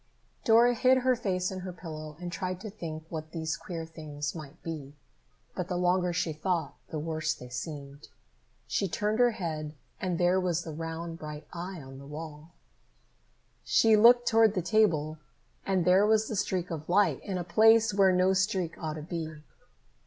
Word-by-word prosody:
Dora 235 0 +6
hid 255 +2 +4
her 255 0 +3
face 185 -5 -1
in 190 - -5
her 185 0 -6
pillow 155 -4 -8
and 175 -1 -5
tried 185 +1 -3
to 215 -1 -6
think 160 -6 -6
what 155 -1 -6
these 160 0 -2
queer 170 -3 -6
things 150 -2 -6
might 155 0 -9
be, 150 -4 -6 0.6
but 180 - -3
the 180 - -2
longer 180 0 +2
she 170 -2 -1
thought, 160 -2 -1
the 155 - -5
worse 155 +1 -2
they 125 - -11
seemed. 140 +2 -7 0.6
She 195 - 0
turned 210 +5 -1
her 245 0 +6
head, 155 -6 -4 0.3
and 180 -2 -1
there 180 +2 +3
was 175 -2 0
the 160 - -6
round 165 +1 -5
bright 150 0 -7
eye 180 +1 -6
on 135 0 -11
the 140 - -11
wall. 155 +1 -8 1.1
She 225 -1 +4
looked 240 +3 +6
toward 225 -2 +5
the 185 - 0
table, 160 -7 +2 0.5
and 190 -3 +1
there 190 +3 +5
was 220 0 +3
the 220 - -3
streak 185 -3 -1
of 155 -1 -6
light 200 +3 +3
in 195 -3 -3
a 175 - -2
place 225 +4 +5
where 195 -1 +5
no 185 +1 +3
streak 190 -3 0
ought 155 -2 -2
to 155 - -6
be. 160 -2 -5
175 Hz, 180 wpm, -29 LUFS, 155-195 Hz, 1.1 s, Dora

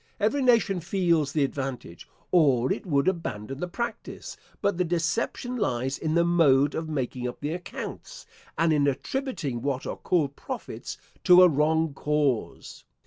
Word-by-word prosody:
Every 220 +7 +1
nation 230 -7 +3
feels 170 -4 +1
the 150 -1 +1
advantage, 135 - -5 0.2
or 135 -8 +4
it - - -8
would 140 -2 +1
abandon 135 - -3
the 180 - -2
practice: 235 +4 -5 0.2
but 200 -3 0
the - - +4
deception 175 +9 -1
lies 135 - -1
in 155 0 -1
the 170 0 +4
mode 145 -5 +4
of 160 0 -4
making 130 -4 -3
up 125 - -7
the 145 +2 -3
accounts, 175 0 -7 0.3
and 165 -1 +3
in 145 -2 +3
attributing 155 - -2
what 135 0 -2
are - - -4
called 145 -6 0
profits - - -7 0.3
to 180 0 +8
a - - +9
wrong 160 0 +1
cause. 145 -4 -1
155 Hz, 155 wpm, -26 LUFS, 135-180 Hz, 0.3 s, a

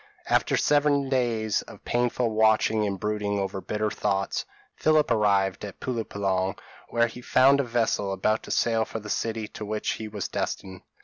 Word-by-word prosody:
p> - - -1
After - - +3
seven 145 -2 +2
days 115 -5 +1
of - - -14
painful 120 -1 0
watching 110 0 +3
and 100 -1 -3
brooding 105 0 -1
over 95 0 -3
bitter 105 +1 -2
thoughts, 95 0 -1 0.3
Philip 155 -3 +3
arrived 100 -4 +2
at 105 - -7
Pulo 120 -3 -2
Penang, 95 -2 -1 0.3
where 115 0 +3
he 120 +1 -7
found 135 +3 +5
a - - +3
vessel 115 -4 0
about 110 +3 +1
to - - -11
sail 115 -1 +2
for 115 - -5
the 105 -1 -6
city 110 +1 -2
to - - -8
which 105 +1 -2
he 110 - -5
was 105 -2 -4
destined. 95 -1 -4
110 Hz, 180 wpm, -26 LUFS, 100-120 Hz, 0.3 s, found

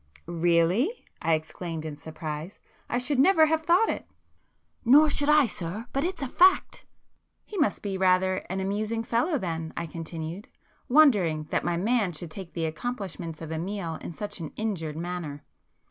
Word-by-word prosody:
"Really!" 175 - +1 0.2
I 165 - +3
exclaimed 160 +1 -5
in 155 -2 -5
surprise—"I 155 +8 -7
should 255 +2 +1
never 320 +2 +6
have 315 0 +1
thought 350 +7 +4
it." - - -3 0.8
"Nor 290 +5 +6
should 290 0 +1
I 300 -2 +6
sir, 200 +1 -5
but 275 - 0
it's 360 -3 -2
a - - -1
fact." 370 +8 +3 0.6
"He 425 - -10
must 295 - +1
be 195 -2 -3
rather 185 0 +3
an 190 +1 -2
amusing 215 +4 -1
fellow 245 +9 +1
then,"—I 165 -4 -4
continued, 165 +3 -6 0.4
wondering 205 - +5
that - - +1
my 175 -1 0
man 210 -1 +1
should 160 +1 -7
take 185 -1 -8
the 165 -2 -1
accomplishments 170 -3 -5
of 160 - -7
Amiel 170 0 -3
in - - -6
such 205 +4 -6
an 160 -3 -6
injured 170 -9 -3
manner. 170 -4 -5
185 Hz, 160 wpm, -27 LUFS, 165-245 Hz, 0.8 s, never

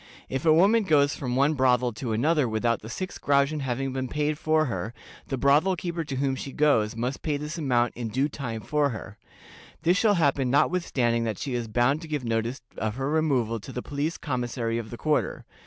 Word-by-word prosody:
If 135 +4 -3
a - - +7
woman 200 +8 +5
goes 145 -7 +3
from 125 -3 -3
one 140 +4 +3
brothel 125 -3 +2
to 115 +2 -4
another 140 +4 +2
without 115 +1 0
the 110 - -9
six 185 +9 -5
groschen 140 +2 +2
having 135 0 -2
been 130 -1 -2
paid 150 +3 -1
for 155 0 +2
her, 115 -3 -4 0.3
the 135 - -2
brothel 145 +8 +3
keeper 170 0 -3
to 140 -3 -5
whom 135 0 0
she 135 - -6
goes 120 -8 +2
must 125 +4 -3
pay 150 -2 -1
this 150 +3 -5
amount 125 -5 +1
in 120 -1 -4
due 130 +6 0
time 125 -6 -5
for 150 +3 +1
her. 110 -3 -8 0.6
This 175 +3 +3
shall 210 -1 +4
happen 140 -6 +2
notwithstanding 130 -6 +1
that 110 -3 -2
she 135 - -4
is 120 -2 -2
bound 120 +7 +1
to 165 - -8
give 150 -5 -3
notice 115 +3 -2 0.2
of 110 0 -2
her 135 +2 -2
removal 130 -8 +1
to 120 - -10
the 125 - -5
police 145 +4 -2
commissary 120 -4 -2
of 110 -2 -7
the 120 - -7
quarter. 155 +3 -1
135 Hz, 210 wpm, -26 LUFS, 120-150 Hz, 0.6 s, a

